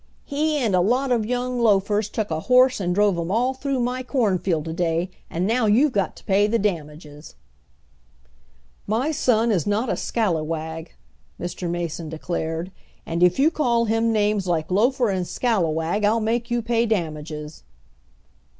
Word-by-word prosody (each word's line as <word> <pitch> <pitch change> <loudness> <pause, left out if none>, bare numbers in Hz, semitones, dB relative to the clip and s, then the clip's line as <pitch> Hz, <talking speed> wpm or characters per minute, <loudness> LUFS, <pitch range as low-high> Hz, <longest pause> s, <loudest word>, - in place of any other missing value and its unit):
"He 300 +2 0
and 225 -9 +1
a 180 - +4
lot 250 +7 +1
of 225 -3 +1
young 250 0 -2
loafers 210 -1 +2
took 215 -5 -3
a 160 - -1
horse 255 +5 +4
and 175 -2 -1
drove 205 -3 +2
him 170 0 -3
all 240 +6 +1
through 265 0 -2
my 250 +1 -1
cornfield 195 - 0
to 160 - -4
day, 170 +1 -1 0.2
and 175 +3 -2
now 225 +2 +1
you've 255 +8 +4
got 200 -5 -1
to - - -15
pay 200 +1 +3
the 230 +2 +1
damages." 150 -6 -5 1.5
"My 240 +9 0
son 235 -6 +2
is 185 -5 0
not 215 +5 0
a - - 0
scallywag," 160 -5 -2 0.4
Mr. 175 0 -4
Mason 170 -2 -4
declared, 165 +2 -4 0.3
"and 170 +1 -3
if 180 0 +4
you 295 +4 +4
call 235 -7 +1
him 225 +1 +1
names 210 -3 +1
like 165 -1 -1
loafer 240 +4 +2
and 185 -2 -2
scallywag 175 -4 0
I'll 215 +3 +3
make 230 +2 -1
you 240 -1 0
pay 230 0 +1
damages." 155 -6 -4
205 Hz, 165 wpm, -23 LUFS, 170-235 Hz, 1.5 s, a